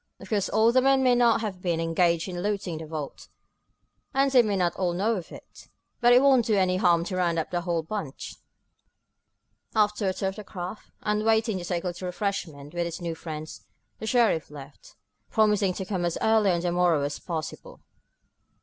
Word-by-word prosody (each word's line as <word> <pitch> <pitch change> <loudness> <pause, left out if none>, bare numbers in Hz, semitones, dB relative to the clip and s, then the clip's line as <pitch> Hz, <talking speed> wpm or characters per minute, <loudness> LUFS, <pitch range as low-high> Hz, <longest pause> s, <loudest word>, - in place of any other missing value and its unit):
Of - - -12
course 205 -3 0
all 220 +2 +4
the 255 +1 +4
men 270 0 +3
there 250 -1 +5
may - - +3
not 235 -2 +4
have 195 -5 -5
been 170 -3 -1
engaged 165 +1 +1
in 175 -1 -5
looting 195 -5 -2
the 160 - -8
vault, 150 -2 -6 0.9
and 275 0 +3
they 255 -2 +7
may 210 -3 -1
not 180 -2 0
all 180 -2 -1
know 210 +6 +1
of 180 -5 -7
it, - - -13 0.3
but 240 0 +5
it 250 +2 +6
won't 260 -4 +4
do 220 - +2
any 185 -2 +2
harm 175 -3 +3
to 185 +2 -4
round 175 -2 +1
up 160 - -2
the 175 -1 -1
whole 170 -2 -1
bunch." 165 -6 -6 1.4
After 210 -2 +2
a - - -1
tour 190 0 -1
of 195 - -9
the 210 - -7
craft, 185 +1 -7
and 210 0 0
waiting 220 -2 +2
to - - -7
take 175 -1 -2
a - - -2
little 180 +1 -6
refreshment 175 -7 -4
with 175 0 -1
his 170 +1 -5
new 170 -2 -3
friends, 155 -1 -8 0.4
the 220 - -5
sheriff 225 - +2
left, 140 -1 -13 0.3
promising 210 -3 +2
to 190 - -4
come 185 -2 -2
as 170 -1 -1
early 220 -2 +3
on 170 -2 +1
the 175 0 -1
morrow 175 -4 +2
as 145 +1 -3
possible. 160 -3 -6
185 Hz, 210 wpm, -26 LUFS, 170-215 Hz, 1.4 s, they